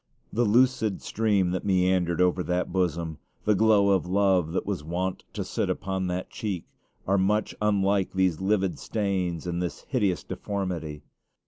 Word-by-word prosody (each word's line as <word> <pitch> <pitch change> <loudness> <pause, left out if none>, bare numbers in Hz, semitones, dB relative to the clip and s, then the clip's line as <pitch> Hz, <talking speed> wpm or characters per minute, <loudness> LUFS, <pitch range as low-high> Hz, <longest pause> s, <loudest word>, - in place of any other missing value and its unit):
The 120 +2 +2
lucid 120 -1 +2
stream 100 -5 +1
that 95 - -2
meandered 90 -2 +2
over 90 0 +3
that 90 0 -1
bosom, 85 -4 -1 0.3
the 105 - +4
glow 105 -1 +4
of 95 -2 +2
love 95 -3 +2
that - - -1
was 95 -7 -3
wont 90 +3 -3
to - - -3
sit - - -2
upon 95 0 -2
that 90 +1 -3
cheek, 100 -6 -4 0.4
are 100 +1 +2
much 105 +3 +1
unlike 100 -2 +2
these 95 -3 +1
livid 95 -1 +1
stains 95 -6 -2
and 85 0 -2
this 90 - -4
hideous 100 - 0
deformity. 90 -7 -4
95 Hz, 155 wpm, -27 LUFS, 90-100 Hz, 0.4 s, the